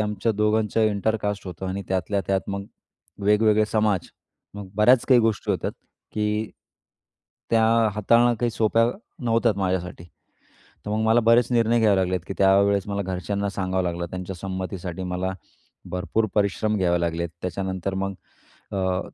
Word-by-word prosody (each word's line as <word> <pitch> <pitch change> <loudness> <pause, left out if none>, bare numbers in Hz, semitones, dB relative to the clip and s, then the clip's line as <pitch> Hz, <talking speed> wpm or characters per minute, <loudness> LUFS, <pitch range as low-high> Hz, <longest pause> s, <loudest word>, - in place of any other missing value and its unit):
आमच्या 105 +1 0
दोघांचं 105 +1 +1
इंटरकास्ट 105 -1 -1
होतं 90 +1 -6
आणि 95 +1 -3
त्यातल्या 95 +2 0
त्यात 95 -1 +1
मग 100 0 -4 0.6
वेगवेगळे 105 +1 +4
समाज 105 -5 +1 0.5
मग 100 -2 -8
बऱ्याच 120 +3 +5
काही 125 -3 +6
गोष्टी 110 -2 0
होत्यात, - - -1 0.4
की 105 0 -1 1.0
त्या 115 -1 +4 0.3
हाताळणं 120 +3 +4
काही 120 - +1
सोप्या 115 +1 +2 0.4
नव्हत्या 115 0 +2
माझ्यासाठी. 90 -2 -2 0.8
तर - - -4
मग 110 +1 0
मला 110 +2 +5
बरेच 115 +2 +4
निर्णय 115 0 +3
घ्यावे 105 -3 +4
लागले, 90 -1 +1
की - - -4
त्यावेळेस 100 0 +3
मला 100 0 -2
घरच्यांना 100 +2 -2
सांगावं 95 -1 -1
लागलं 85 -1 -2
त्यांच्या 90 0 -5
संमतीसाठी 95 -1 -5
मला 90 +1 -2 0.6
भरपूर 100 +5 0
परिश्रम 105 +1 +1
घ्यावे 85 -2 +2
लागलेत. 85 0 -1
त्याच्यानंतर 95 +1 -3
मग 95 0 -2 0.6
अ, 95 -1 0
100 Hz, 140 wpm, -24 LUFS, 95-110 Hz, 1.0 s, काही